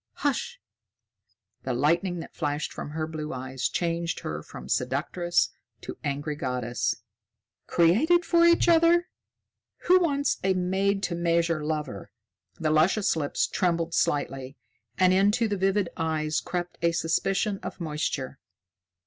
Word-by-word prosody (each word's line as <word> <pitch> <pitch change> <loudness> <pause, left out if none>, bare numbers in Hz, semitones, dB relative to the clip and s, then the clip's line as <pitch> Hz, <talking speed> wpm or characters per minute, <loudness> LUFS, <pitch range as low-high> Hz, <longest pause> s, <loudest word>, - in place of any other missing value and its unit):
"Hush!" 385 - -2 1.0
The 130 - -2
lightning 170 +6 +1
that - - -11
flashed 145 -2 -2
from - - -6
her 155 +1 -3
blue 155 -1 -5
eyes 130 0 -3
changed 170 -1 -2
her 75 0 -4
from - - -10
seductress 155 +7 0 0.3
to - - -7
angry 145 +1 -2
goddess. 125 -3 -2 0.6
"Created 295 - +4
for 340 -1 +4
each 340 0 +5
other! 340 +1 +4 0.7
Who 365 +1 +6
wants 285 -5 +1
a 190 0 +2
made 195 +2 0
to 175 - -1
measure 170 -2 +1
lover?" 150 -9 -4 0.5
The 155 -1 +1
luscious 170 +7 +3
lips 145 -3 0
trembled 170 -2 0
slightly, 135 -2 -1 0.4
and 185 0 +4
into 205 +5 +3
the 205 - -1
vivid 195 0 +1
eyes 155 -1 -1
crept 175 -1 -4
a 170 0 +2
suspicion 195 +5 0
of - - -7
moisture. 150 -4 -3
170 Hz, 130 wpm, -27 LUFS, 150-195 Hz, 1.0 s, Who